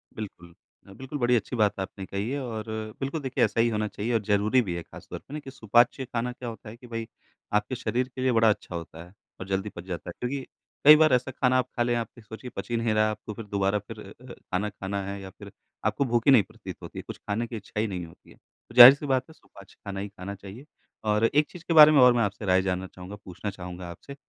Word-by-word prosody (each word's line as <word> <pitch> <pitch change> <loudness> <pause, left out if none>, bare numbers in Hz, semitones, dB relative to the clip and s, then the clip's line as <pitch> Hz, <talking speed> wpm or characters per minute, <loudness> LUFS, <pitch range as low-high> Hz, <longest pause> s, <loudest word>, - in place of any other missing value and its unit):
बिल्कुल। 90 -5 -8 0.4
बिल्कुल 135 +2 -6
बड़ी 120 0 +3
अच्छी 115 +3 -1
बात 105 -4 +1
आपने 95 0 -5
कही 100 +4 -3
है 140 +2 -2
और 115 -4 -4 0.4
बिल्कुल 140 +3 -3
देखिए 130 -2 0
ऐसा - - -3
ही 120 - +3
होना 105 -1 -1
चाहिए 110 +4 -3
और 115 - +2
ज़रूरी 105 +5 +3
भी 90 -6 -3
है 85 - -4
ख़ास - - -14
तौर - - -6
पे 145 - -14
ना 150 - -3
कि 135 -2 -10
सुपाच्य 120 +2 +2
खाना 125 0 -3
क्या 125 -1 -7
होता 110 -1 -10
है 115 - -11
कि 125 0 -14
भई 115 -1 -5 0.5
आपके 105 +5 +1
शरीर 125 0 -1
के 130 - -4
लिए 130 - +2
बड़ा 115 -2 +4
अच्छा 100 -4 -2
होता 85 0 -7
है 90 +2 -17 0.3
और 95 - -7
जल्दी 95 +2 -1
पच 85 - -7
जाता 90 -1 -6
है। - - -6
क्योंकि 135 +3 -2 0.4
कई 150 +1 +11
बार 155 -2 +4
ऐसा 125 +1 +1
खाना 130 0 +2
आप 130 - +1
खा 120 - +3
लें, 120 - 0
आप 115 -2 -2
ये 120 - -12
सोचिए 110 +4 -9
पची 120 - -3
नहीं 115 -1 0
रहा 110 0 +3
है, 110 - +2
आपको 105 0 -7
फिर 115 0 -8
दोबारा 100 0 0
फिर 110 +2 -11
अ, 120 +5 -12
खाना, 100 +3 -3
खाना 100 0 -4
है 100 +1 -5
या 95 - -8
फिर - - -13 0.3
आपको 110 +6 +1
भूख 120 -2 +1
ही - - +8
नहीं 120 -6 +7
प्रतीत - - -10
होती - - -8
है, - - -7
कुछ - - -7
खाने 110 +3 -3
की 120 - -7
इच्छा 105 +1 -6
ही 110 - +1
नहीं 90 -3 -4
होती 80 - -18
है। - - -18
तो 120 - -22
जाहिर 125 +1 +13
सी 140 +1 -7
बात 130 -2 +1
है 160 - -13
सुपाच्य 100 -9 -18
खाना 100 -1 -5
ही 100 - -4
खाना 100 +1 -8
चाहिए 100 +7 -11 0.4
और 105 +1 +2
एक 145 +6 +3
चीज़ 175 -3 -11
के 165 - +1
बारे 155 -1 +10
में 150 - +5
और 125 -1 +8
मैं 120 -1 +2
आपसे 100 +1 -3
राय 95 0 +4
जानना 95 0 -2
चाहूँगा, 90 +3 -10
पूछना 95 +3 -5
चाहूँगा 90 -2 -8
आपसे 140 +10 -11
110 Hz, 270 wpm, -27 LUFS, 100-125 Hz, 0.5 s, जाहिर